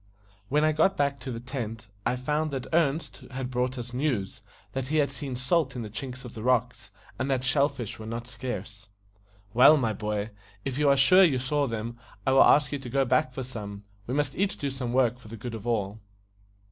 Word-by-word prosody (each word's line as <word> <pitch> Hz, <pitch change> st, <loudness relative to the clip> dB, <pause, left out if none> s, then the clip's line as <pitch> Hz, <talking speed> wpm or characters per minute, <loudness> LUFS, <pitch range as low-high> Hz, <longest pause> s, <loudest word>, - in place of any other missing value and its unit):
When 150 Hz, +2 st, +3 dB
I 155 Hz, -, +4 dB
got 160 Hz, +5 st, +2 dB
back 140 Hz, -1 st, +1 dB
to 130 Hz, +1 st, -6 dB
the 115 Hz, -, -4 dB
tent, 115 Hz, -3 st, -5 dB, 0.2 s
I 125 Hz, -, +1 dB
found 150 Hz, +5 st, -1 dB
that 135 Hz, -3 st, -4 dB
Ernest 160 Hz, -1 st, +1 dB
had 130 Hz, -1 st, -4 dB
brought 125 Hz, +1 st, -1 dB
us 120 Hz, 0 st, -6 dB
news 125 Hz, -7 st, -1 dB, 0.3 s
that 135 Hz, -1 st, -3 dB
he 155 Hz, -, -1 dB
had 145 Hz, -2 st, +2 dB
seen 135 Hz, -1 st, -5 dB
salt 130 Hz, +3 st, +1 dB
in 120 Hz, -, -3 dB
the 105 Hz, -, -7 dB
chinks 130 Hz, +3 st, -6 dB
of 120 Hz, -, -8 dB
the 110 Hz, -, -7 dB
rocks, 125 Hz, -3 st, 0 dB, 0.3 s
and 130 Hz, +2 st, -1 dB
that 130 Hz, -2 st, +1 dB
shell 140 Hz, +2 st, +3 dB
fish 125 Hz, -8 st, -7 dB
were 110 Hz, -, -7 dB
not 115 Hz, +1 st, -5 dB
scarce. 110 Hz, -4 st, -6 dB, 0.6 s
"Well, 130 Hz, +6 st, +8 dB
my 115 Hz, -6 st, 0 dB
boy, 105 Hz, 0 st, -3 dB, 0.3 s
if 135 Hz, +1 st, -2 dB
you 150 Hz, -1 st, +4 dB
are 140 Hz, -, +5 dB
sure 185 Hz, +8 st, +7 dB
you 150 Hz, -8 st, +4 dB
saw 140 Hz, +3 st, 0 dB
them, 115 Hz, 0 st, -4 dB, 0.3 s
I 130 Hz, -, +3 dB
will 135 Hz, -, +6 dB
ask 145 Hz, -2 st, +6 dB
you 145 Hz, -, -2 dB
to 130 Hz, -2 st, -8 dB
go 135 Hz, +2 st, +2 dB
back 125 Hz, +1 st, +2 dB
for 130 Hz, +1 st, -5 dB
some. 105 Hz, -5 st, -7 dB, 0.2 s
We 125 Hz, -, -2 dB
must 145 Hz, 0 st, 0 dB
each 195 Hz, +1 st, 0 dB
do 140 Hz, -1 st, -2 dB
some 130 Hz, -3 st, -3 dB
work 125 Hz, -1 st, +2 dB
for 120 Hz, -, -14 dB
the 115 Hz, +2 st, -8 dB
good 115 Hz, +2 st, -6 dB
of 110 Hz, 0 st, -6 dB
all." 105 Hz, -2 st, -1 dB
130 Hz, 225 wpm, -27 LUFS, 115-140 Hz, 0.6 s, Well